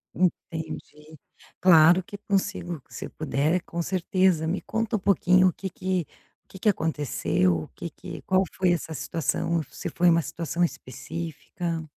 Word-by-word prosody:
Entendi. 160 Hz, -3 st, -3 dB, 0.4 s
Claro 175 Hz, 0 st, +7 dB
que 205 Hz, -, -9 dB
consigo, 190 Hz, -5 st, -2 dB
se -, -, -7 dB
puder 155 Hz, +3 st, 0 dB
com 170 Hz, -, -4 dB
certeza, 185 Hz, -2 st, +1 dB
me 180 Hz, +4 st, -1 dB
conta 225 Hz, 0 st, -1 dB
um -, -, -6 dB
pouquinho 185 Hz, -1 st, +4 dB
o 180 Hz, -, +1 dB
que 195 Hz, -, -5 dB
que 185 Hz, -1 st, -2 dB, 0.4 s
o -, -, -46 dB
que 190 Hz, -, -9 dB
que 215 Hz, -, +3 dB
aconteceu? 95 Hz, -, +1 dB
O -, -, -10 dB
que 70 Hz, -, -7 dB
que -, -, -9 dB
qual 190 Hz, 0 st, +3 dB
foi 185 Hz, -2 st, +3 dB
essa 165 Hz, -1 st, -3 dB
situação, 165 Hz, +2 st, -1 dB
se 175 Hz, -, -5 dB
foi 175 Hz, +2 st, +3 dB
uma 170 Hz, 0 st, +4 dB
situação 170 Hz, +2 st, -2 dB
específica? 165 Hz, +2 st, -4 dB
170 Hz, 155 wpm, -26 LUFS, 160-185 Hz, 0.4 s, Claro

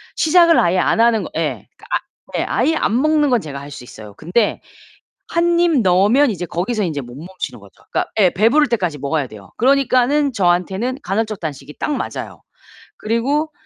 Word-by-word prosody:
시작을 335 Hz, +1 st, +4 dB
아예 175 Hz, +2 st, +2 dB
안 220 Hz, -, +1 dB
하는 230 Hz, -2 st, +3 dB
거 -, -, -7 dB
예. -, -, -3 dB, 0.2 s
아 -, -, +2 dB, 0.4 s
네. -, -, 0 dB
아예 320 Hz, -, +1 dB
안 240 Hz, -4 st, +1 dB
먹는 305 Hz, -1 st, +2 dB
건 245 Hz, -3 st, +2 dB
제가 140 Hz, -3 st, -7 dB
할 145 Hz, +1 st, -10 dB
수 125 Hz, -, -9 dB
있어요. 110 Hz, -4 st, -12 dB
근데 185 Hz, +8 st, 0 dB, 0.7 s
1 340 Hz, 0 st, +2 dB
입 330 Hz, -7 st, +3 dB
넣으면 205 Hz, +9 st, +4 dB
이제 180 Hz, -4 st, -4 dB
거기서 210 Hz, +7 st, -2 dB
인제 155 Hz, -5 st, -3 dB
못 120 Hz, -1 st, -11 dB
멈추는 180 Hz, +6 st, -7 dB
거죠. -, -, -19 dB
그러니까 -, -, -2 dB
예. 185 Hz, -3 st, +5 dB
배부를 245 Hz, -, +3 dB
때까지 180 Hz, -10 st, -1 dB
먹어야 140 Hz, +1 st, -1 dB
돼요. 105 Hz, -4 st, -13 dB
그러니까는 275 Hz, +2 st, +2 dB
저한테는 190 Hz, +5 st, 0 dB
간헐적 215 Hz, -2 st, -2 dB
단식이 145 Hz, -2 st, -7 dB
딱 300 Hz, -, -2 dB
맞아요. -, -, -6 dB, 0.6 s
그리고 275 Hz, +8 st, -1 dB
215 Hz, 360 characters per minute, -18 LUFS, 170-275 Hz, 0.7 s, 예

